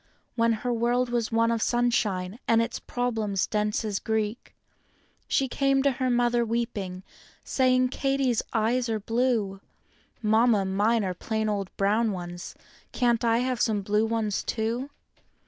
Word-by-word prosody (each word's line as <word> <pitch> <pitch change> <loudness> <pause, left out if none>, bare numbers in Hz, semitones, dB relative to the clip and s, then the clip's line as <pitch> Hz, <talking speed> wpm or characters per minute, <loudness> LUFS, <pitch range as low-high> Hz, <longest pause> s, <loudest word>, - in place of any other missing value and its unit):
When 230 -1 +3
her 245 - +1
world 240 +2 +1
was 235 -1 -1
one 230 0 +2
of 230 -1 -1
sunshine, 220 -5 0
and 230 - +4
its 230 +1 -1
problems 220 -6 -1
dense 210 +1 -1
as 205 -2 -1
Greek, 220 0 -3 0.7
She 270 - +1
came 275 +1 +1
to 280 - +4
her 255 0 -1
mother 240 -1 +2
weeping, 220 -5 -3 0.4
saying 255 -1 +2
"Katy's 270 -3 0
eyes 235 +2 +1
are 220 -1 0
blue; 225 -3 0 0.6
Mamma, 220 -1 +3
mine 210 +4 +1
are 185 -1 -1
plain 220 +4 -2
old 200 -3 -2
brown 215 +3 +2
ones—can't 185 +6 -3
I 230 0 +3
1 255 -1 -1
some 220 -3 +1
blur 210 +2 +1
^ 220 -3 -1
too?" 235 +4 -2
230 Hz, 145 wpm, -26 LUFS, 210-245 Hz, 0.7 s, and